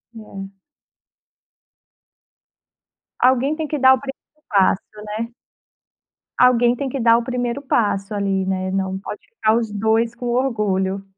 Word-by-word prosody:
É. 200 -3 -9 2.7
Alguém 260 +4 +3
tem 315 -1 -3
que 300 - -2
dar 260 0 +7
o 260 - +1
primeiro 280 +3 -11
passo, 195 -3 +3 0.3
né. 220 +3 -5 1.1
Alguém 245 -1 +4
tem 270 +2 -3
que 270 +1 -4
dar 230 0 +5
o 235 - -2
primeiro 245 +1 -3
passo, 205 -6 0
ali, 195 -2 0
né, 185 0 -2
não 190 0 -1
pode - - -8
ficar 225 - +1
os 230 -2 -1
2 220 +3 +1
com 245 0 -6
orgulho. 210 -6 0
230 Hz, 135 wpm, -20 LUFS, 195-250 Hz, 2.7 s, dar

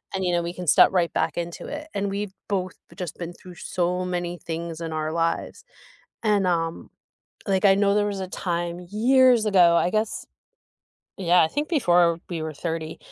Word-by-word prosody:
and, 190 - -2
you 180 - +1
know, 175 - +2
we 170 0 -4
can 180 -1 -7
step - - +7
right 175 -3 +1
back - - -1
into 170 0 -5
it, 300 +1 -6
and 200 0 -1
we've 200 0 -4 0.2
both 185 -2 -1 0.2
v - - -17
just 180 -5 -6
been 175 0 -6
through 180 0 -13
so 180 +2 -2
many 175 -1 -3
things 165 0 -5
in 165 -1 -4
our 155 0 -2
lives. 165 0 -2 0.6
And, 205 -3 +2
um, 165 -2 -1 0.6
like, 195 0 +1
I 195 -1 +7
know 200 0 +3
there 210 0 +2
was 200 -1 -3
a 190 - -4
time 175 -1 -3
years 245 +2 +4
ago, 180 -4 +5
I 175 - +2
guess 215 +2 -2 0.9
Yeah, 180 -1 +4
I 160 - +2
think 295 - -3
before 175 - +3
we 165 -2 -3
were 155 - -4
30, 160 0 -4
180 Hz, 195 wpm, -24 LUFS, 170-200 Hz, 0.9 s, step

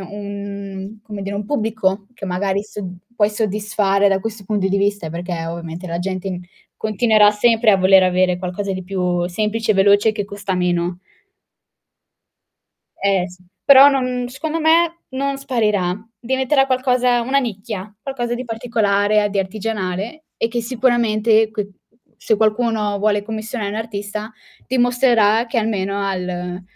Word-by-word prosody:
un, 200 +1 -7
come 210 -2 -7
dire 200 +1 -4
un 205 - -3
pubblico, 215 -5 -1
che 205 -5 -8
magari 190 +2 -1
sod 195 -4 -7 0.2
puoi 210 -2 +2
soddisfare 210 -1 +1
da 195 -1 +2
questo 220 +1 -6
punto 205 -1 0
di 195 +1 +1
vista, 200 -4 0
perché 175 +3 -5
ovviamente 170 +1 -6
la 170 -1 -3
gente 185 +1 -4
in 185 -2 -3 0.4
continuerà 215 -1 +4
sempre 225 +1 +3
a 200 - +5
voler 190 0 +6
avere 185 0 +2
qualcosa 185 +2 -3
di 185 0 -4
più 180 -2 -1
semplice 215 +4 -1
e - - +4
veloce 200 +2 +4
che 210 -1 -3
costa 200 -1 -4
meno. 175 0 0 2.0
Eh 195 -2 +2
sì. 180 +1 -17 0.2
Però 280 0 +9
non 255 -3 -1
secondo 315 +6 -3
me 335 +2 +3
non 275 +1 -2
sparirà. 210 -9 0 0.2
Diventerà 265 +3 +1
qualcosa 250 -2 +2
una 265 +4 +1
nicchia, 210 -4 -5
qualcosa 240 -3 -3
di 250 +1 -5
particolare 215 -3 +1
a 205 - +1
di 200 0 -3
artigianale 205 - -3
e 230 - 0
che 235 +1 -2
sicuramente 230 -3 +2
che 210 -2 -4 0.5
se 220 - 0
qualcuno 215 -1 +1
vuole 205 0 +1
commissioni 220 +1 -5
a - - -2
un 200 - -4
artista 215 -1 -5 0.4
dimostrerà 245 -3 +3
che 235 - -1
almeno 200 -3 -1
al, 180 -1 -4
210 Hz, 150 wpm, -19 LUFS, 195-230 Hz, 2.0 s, Però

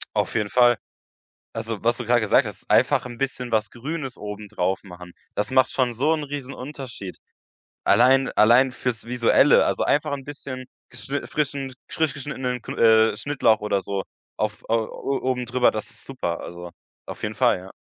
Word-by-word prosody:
Auf - - 0
jeden 105 -1 0
Fall. 120 -2 +5 0.8
Also 115 -1 -5
was 120 0 +3
du 120 - -4
gerade 120 0 +4
gesagt 110 - +3
hast, - - -9
einfach - - +4
'n 120 -2 -9
bisschen 130 -2 -3
was 110 -2 +1
Grünes 135 +1 -5
oben 105 0 -7
drauf 95 -2 -1
machen. 90 -2 -11 0.2
Das 105 +4 -2
macht 130 0 +4
schon 125 -2 +1
so 140 +7 +1
'n 155 -2 -3
Riesenunterschied. 135 -6 -7 0.7
Allein 130 +3 +5
allein 120 +4 +5
fürs 125 -2 -3
Visuelle, 120 -1 +4
also - - 0
einfach 145 0 +1
'n 135 -2 -4
bisschen 135 -3 -7 0.3
geschni 135 +5 -4
frischen 140 -3 -2 0.2
frisch 160 -2 0
geschnittenen 130 -3 -4
kn - - -7
äh, 110 -2 +5
Schnittlauch 115 -4 +2
oder 100 -2 0
so 100 0 -3 0.3
auf, 105 0 -3
äh, - - -1
o 115 +4 -1
oben 125 -1 -1
drüber. 125 0 +3
Das 110 - -5
ist - - -12
super. 105 -11 -4
Also 85 0 -8 0.4
auf - - -8
jeden 105 0 -3
Fall, 120 -5 +3
ja. 95 +1 -11
120 Hz, 180 wpm, -24 LUFS, 105-135 Hz, 0.8 s, Fall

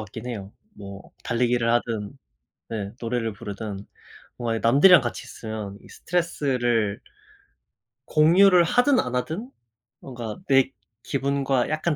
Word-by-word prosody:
같긴 110 +2 -8
해요, 105 -5 -6 0.2
뭐 100 -1 -10 0.2
달리기를 120 -1 +1
하든 115 +1 -2 0.5
네 105 -3 -5
노래를 115 -1 -2
부르든. 100 0 -7 0.5
뭔가 115 -2 -2
이 - - -4
남들이랑 145 +7 +7
같이 120 - -4
있으면 110 -3 -7
이 - - -16
스트레스를 125 - -1 1.1
공유를 175 +4 +5
하든 250 - +3
안 125 0 -2
하든 165 - -3 0.5
뭔가 120 -5 -7
내 135 -1 +4 0.3
기분과 140 -2 0
약간 155 +1 0
120 Hz, 260 characters per minute, -24 LUFS, 110-145 Hz, 1.1 s, 남들이랑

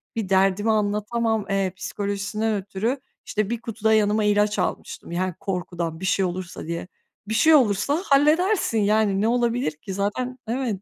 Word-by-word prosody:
bir 220 -4 -3
derdimi 195 +3 +3
anlatamam, 215 +1 0
eee, 195 -2 0
psikolojisinden 205 +3 -2
ötürü, 205 +6 -2 0.3
işte, 215 -1 -1
1 235 -1 -3
kutu 230 -3 -8
da 220 - +5
yanıma 215 0 +3
ilaç 210 0 +2
almıştım, 180 - -4
yani, 185 +1 -1
korkudan 175 -3 -3
bir 190 - -5
şey 190 0 +2
olursa 180 -2 -5
diye. 170 +1 -4 0.4
"Bir 220 - -2
şey 315 +7 +6
olursa 255 - +2
halledersin." 305 - +3
yani, 210 -1 +2
ne 220 - +2
olabilir 240 -6 +1
ki? 155 +5 -8
Zaten 245 +6 -2
Evet. 230 -5 -2
210 Hz, 160 wpm, -24 LUFS, 195-230 Hz, 0.4 s, şey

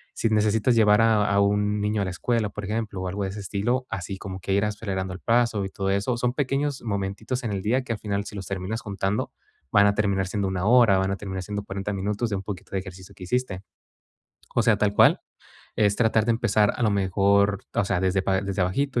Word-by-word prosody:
si 115 - 0
necesitas 110 +3 +2
llevar 105 -1 +5
a 110 -2 +3
a 100 0 +3
un 105 +1 +1
niño 105 0 0
a 100 - 0
la 95 - -3
escuela, 115 +2 -1
por 105 0 -7
ejemplo, 105 -2 -3
o 95 - -3
algo 100 +2 -3
de 95 - -2
ese 105 - -7
estilo, 110 +7 -1
así 95 +1 -5
como 95 -1 -7
que 95 +2 -2
ir 100 +1 +2
acelerando 100 -3 -3
el 95 - -8
paso 115 -3 +1
y - - -5
todo 95 0 -3
eso, 100 +5 0
son 125 0 0
pequeños 140 0 -1
momentitos 100 +4 -3
en 115 - -2
el 95 - -2
día 125 +5 +1
que, 115 - -3
al 105 - -6
final, 100 -1 -2
si - - -9
los 95 -2 -6
terminas 95 +4 -4
juntando, 100 0 -2 0.4
van 100 0 +5
a 100 - +2
terminar 100 -3 0
siendo 100 +1 -2
1 95 0 -2
hora, 115 -3 +5
van 95 +1 0
a 100 - -2
terminar 95 -2 -5
siendo 105 0 -4
40 100 0 -4
minutos 105 +4 -2
de 100 - -1
un 95 - -6
poquito 100 -1 -7
de 95 - -1
ejercicio 95 -1 -11
que 95 - -11
hiciste. 100 -3 -2 0.9
O - - +4
sea, - - +4
tal 100 -1 +1
cual, - - +5 0.6
es 105 -2 +3
tratar 110 -2 +2
de 120 - +3
empezar, 110 -2 +2
a - - -3
lo 110 - +3
mejor, 100 0 +2
t - - +1
o - - +1
sea, 95 -2 0
desde 95 +1 +1
pa 95 0 +1
desde 100 -1 -1
abajito 125 +8 0
100 Hz, 245 wpm, -25 LUFS, 95-110 Hz, 0.9 s, llevar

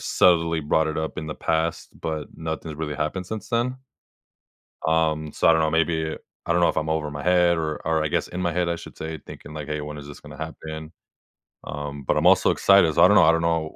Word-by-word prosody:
subtly 85 -2 +3
brought 80 +2 +1
it 80 - -3
up 80 0 -3
in 80 - -5
the 75 - -4
past, 80 +1 -1
but 75 -3 -4
nothing's 80 -1 -5
really 75 -1 -4
happened 90 +5 -3
since 110 +1 -6
then 120 +2 0 1.1
um, 80 -2 +1
so - - +2
I - - +8
don't 80 - +3
know, 80 0 +2
maybe 80 -1 0 0.3
I 85 - +2
don't 90 - +2
know 85 - +4
if - - -2
I'm 80 0 -1
over 80 -1 -1
my 75 0 -6
head 90 -1 +4
or 80 -2 -2
or 80 -1 +1
I - - 0
guess, - - -1
in 90 - -5
my 85 -2 0
head, 90 -1 0
I 85 - -1
should - - -11
say, 80 0 -5
thinking 75 - -10
like, 75 -2 -6
hey, 75 0 -2
when 75 0 -7
is 70 - -9
this 75 - -11
gonna - - -12
happen? 80 0 -7 0.7
Um, 70 -1 -6
but - - +1
I'm - - +2
also - - +5
excited. 100 -5 +4
So - - +4
I - - +8
don't - - +5
know - - +7
I 80 - +6
don't 85 - 0
know 80 -2 0
80 Hz, 250 wpm, -24 LUFS, 75-85 Hz, 1.1 s, I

